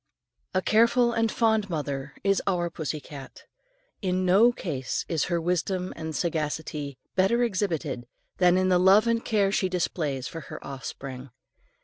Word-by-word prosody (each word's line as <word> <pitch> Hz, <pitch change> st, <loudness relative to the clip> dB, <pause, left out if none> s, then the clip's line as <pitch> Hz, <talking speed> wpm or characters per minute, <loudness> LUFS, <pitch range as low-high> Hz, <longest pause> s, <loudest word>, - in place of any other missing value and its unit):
A 185 Hz, -, +2 dB
careful 235 Hz, +2 st, +4 dB
and 225 Hz, -1 st, +1 dB
fond 220 Hz, -3 st, +2 dB
mother 145 Hz, -3 st, -4 dB
is 195 Hz, 0 st, +2 dB
our 175 Hz, -3 st, 0 dB
pussy 155 Hz, -1 st, -4 dB
cat. 140 Hz, -2 st, -11 dB, 0.6 s
In 185 Hz, -2 st, 0 dB
no 200 Hz, +7 st, +6 dB
case 140 Hz, -, -3 dB
is 160 Hz, -3 st, 0 dB
her 170 Hz, -1 st, 0 dB
wisdom 180 Hz, +2 st, -1 dB
and 160 Hz, -1 st, -5 dB
sagacity 150 Hz, -4 st, -2 dB, 0.2 s
better 195 Hz, +6 st, +3 dB
exhibited 165 Hz, -, -2 dB, 0.3 s
than 180 Hz, 0 st, +4 dB
in 185 Hz, 0 st, +2 dB
the 180 Hz, -1 st, +4 dB
love 195 Hz, +4 st, +6 dB
and 230 Hz, 0 st, +1 dB
care 205 Hz, -3 st, +2 dB
she 190 Hz, -2 st, +1 dB
displays 155 Hz, -7 st, -2 dB
for 165 Hz, -, -7 dB
her -, -, -7 dB
offspring. 135 Hz, -1 st, -7 dB
180 Hz, 150 wpm, -26 LUFS, 150-195 Hz, 0.6 s, no